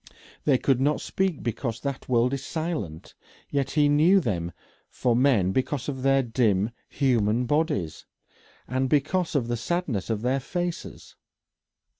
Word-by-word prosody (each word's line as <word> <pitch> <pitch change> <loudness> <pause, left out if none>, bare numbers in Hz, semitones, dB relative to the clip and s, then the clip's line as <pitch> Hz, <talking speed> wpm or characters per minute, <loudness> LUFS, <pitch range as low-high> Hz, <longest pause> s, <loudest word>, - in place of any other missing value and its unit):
They 140 -3 +4
could 130 0 +1
not 150 +2 +2
speak 190 -6 -1
because 115 0 -3
that 140 -2 -5
world 125 +1 +3
is 135 -1 -3
silent, 155 - -4 0.4
yet 140 -2 0
he 150 0 +3
knew 155 +7 +5
them 90 - -2 0.4
for 120 -2 0
men 120 -8 +3
because 130 +3 -1
of 135 -3 -4
their 135 0 +3
dim 115 -3 +1 0.2
human 120 -3 +1
bodies, 145 - -1 0.6
and 130 +1 0
because 165 +5 +1
of 125 -5 +1
the 120 0 -1
sadness 130 - -2
of 110 -1 -1
their 130 +2 +1
faces. 175 +5 -5
130 Hz, 145 wpm, -26 LUFS, 115-150 Hz, 0.6 s, knew